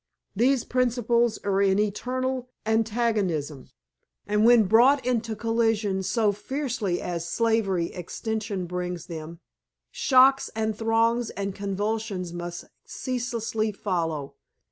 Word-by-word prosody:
These 250 +4 +3
principles 240 -2 +1
are 200 -1 +1
in 195 -1 +3
eternal 250 +5 -2 0.2
antagonism, 215 - 0 0.6
and 210 +1 +1
when 235 -1 +7
brought 240 +8 +4
into 230 -3 -1
collision 225 -3 0
so 210 +3 +1
fiercely 225 -4 -2
as 170 -1 -4
slavery 215 -7 +1
extension 205 +1 -4
brings 180 -1 -4
them, 165 0 -8 0.5
shocks 265 +1 +4
and 220 -1 -1
throes 225 +1 +1
and 195 0 -4
convulsions 200 -2 -3
must 175 0 -6 0.2
ceaselessly 230 -4 -2
follow. 165 -8 -2
215 Hz, 105 wpm, -26 LUFS, 190-235 Hz, 0.6 s, when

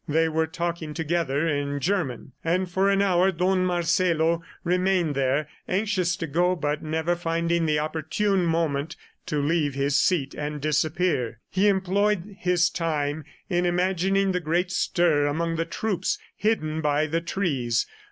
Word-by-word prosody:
They 160 +2 +2
were 160 0 0
talking 170 -2 -4
together 160 -2 0
in 145 -2 -1
German, 140 - -2
and 180 +3 +1
for 190 +3 +1
an 200 0 +3
hour 185 -1 +3
Don 185 +1 +1
Marcelo 170 -2 +1 0.2
remained 180 -2 +1
there, 135 +2 0 0.2
anxious 185 -3 0
to 165 - -4
go 175 +4 +1
but 150 -2 -2
never 160 +2 -1
finding 170 0 0
the 150 -1 +2
opportune 160 +6 0
moment 165 -2 0 0.3
to 150 - -1
leave 145 -1 0
his 140 +1 +2
seat 140 -6 +1
and 150 0 -4
disappear. 155 -5 0
He 195 +2 +3
employed 200 0 +1
his 180 -1 +2
time 150 -3 -2 0.2
in 175 -1 +1
imagining 190 +2 +1
the 180 - 0
great 175 +2 0
stir 165 -5 +2
among 165 +3 -1
the 165 - 0
troops 190 -3 -1 0.2
hidden 160 -8 0
by 150 0 +2
the 165 +2 -1
trees. 140 -11 0
165 Hz, 150 wpm, -25 LUFS, 150-180 Hz, 0.3 s, an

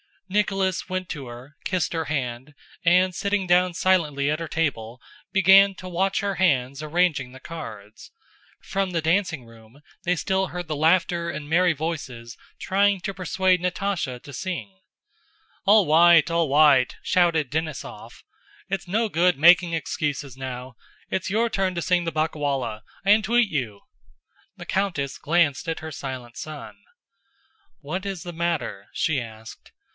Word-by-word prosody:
Nicholas 195 -2 0
went 185 -1 -4
to 140 -6 -6
her, 125 +5 -11
kissed 185 -3 -1
her 165 -1 -2
hand, 135 -1 -4 0.3
and 180 +2 +4
sitting 200 +1 -1
down 180 0 +3
silently 150 -6 +1
at 155 - -1
her 165 - -4
table 125 -8 -2 0.3
began 195 +1 +6
to 185 0 -9
watch 190 +2 0
her 200 -1 -2
hands 140 -6 +1
arranging 155 -5 0
the 130 - -11
cards. 110 -10 -10 0.5
From 195 -1 -2
the 165 -2 -1
dancing 165 -5 0
room, 115 +4 -18 0.2
they 180 +1 +1
still 190 +2 0
heard 180 -1 -6
the 155 - -1
laughter 170 +2 +2
and 150 -3 -6
merry 175 +1 +3
voices 130 -7 -5 0.2
trying 200 0 +2
to 195 - -4
persuade 185 0 +1
Natásha 180 -8 -2
to 140 - -11
sing. 120 - -5 0.9
"All 205 0 +6
wight! 165 +1 +6
All 165 -1 +2
wight!" 140 -3 +4
shouted 165 -6 +2
Denísov. 155 0 -5 0.5
"It's 195 -1 -3
no 220 +5 0
good 175 -2 +2
making 170 +3 +6
excuses 145 -4 -3
now! 130 -1 -7 0.3
It's 190 - -2
your 225 +4 +1
turn 190 -3 -1
to 170 - -2
sing 175 0 +1
the 165 - -1
ba'cawolla—I 145 - -3
entweat 220 +2 +4
you!" 120 -9 -3 0.7
The - - -10
countess 170 -9 -1
glanced 165 -1 +1
at 165 - -3
her 160 0 -7
silent 130 -4 -7
son. 140 -10 -8 1.0
"What 180 +7 -4
is 195 -4 -4
the 175 - -7
matter?" 160 -12 -2
she 155 -4 0
asked. 110 -1 -11
165 Hz, 150 wpm, -24 LUFS, 140-185 Hz, 1.0 s, began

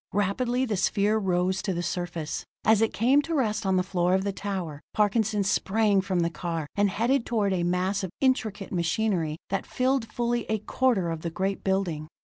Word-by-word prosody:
Rapidly 240 +6 +1
the 215 -5 -1
sphere 205 +3 +2
rose 185 -1 0
to 190 -3 -2
the 175 - -2
surface. 170 -3 -3 0.2
As 220 -1 +5
it 225 - +2
came 260 +6 +3
to 325 +3 -3
rest 220 -6 0
on 190 - +2
the 185 - +2
floor 180 -1 +1
of 190 - +1
the 200 0 -2
tower, 185 -8 -4
Parkinson 210 0 +2
sprang 205 0 +2
from 185 -2 0
the 170 0 0
car, 165 -2 -3
and 205 0 +3
headed 235 +6 +1
toward 210 -5 0
a 180 - 0
mass 180 +3 0
of 190 - -2
intricate 220 -7 0
machinery 170 -2 0
that 195 - 0
filled 255 -3 0
fully 240 -1 -1
a 220 - +1
quarter 215 -4 +1
of 165 -1 -4
the 170 - -3
great 190 +3 -2
building. 185 -6 -1
195 Hz, 195 wpm, -27 LUFS, 180-220 Hz, 0.2 s, As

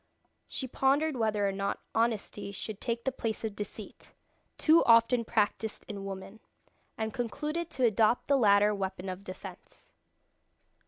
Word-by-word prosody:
She 260 - -4
pondered 275 +4 +2
whether 215 -4 +1
or - - 0
not 195 +1 -2
honesty 220 -3 -1
should 210 +1 -6
take 235 -1 -2
the 265 - 0
place 225 -4 -3
of 215 -2 -3
deceit 210 - -8 0.4
too 325 +1 +5
often 230 +1 +5
practised 220 0 -1
in 200 -2 -6
women 195 +2 -7 0.6
and 220 -1 -2
concluded 300 +7 -3
to 260 -2 0
adopt 225 +1 +3
the 280 - +4
latter 205 -4 +5
weapon 190 -1 -4
of 185 +1 -6
defence. 185 -1 -11
220 Hz, 145 wpm, -30 LUFS, 200-245 Hz, 0.6 s, too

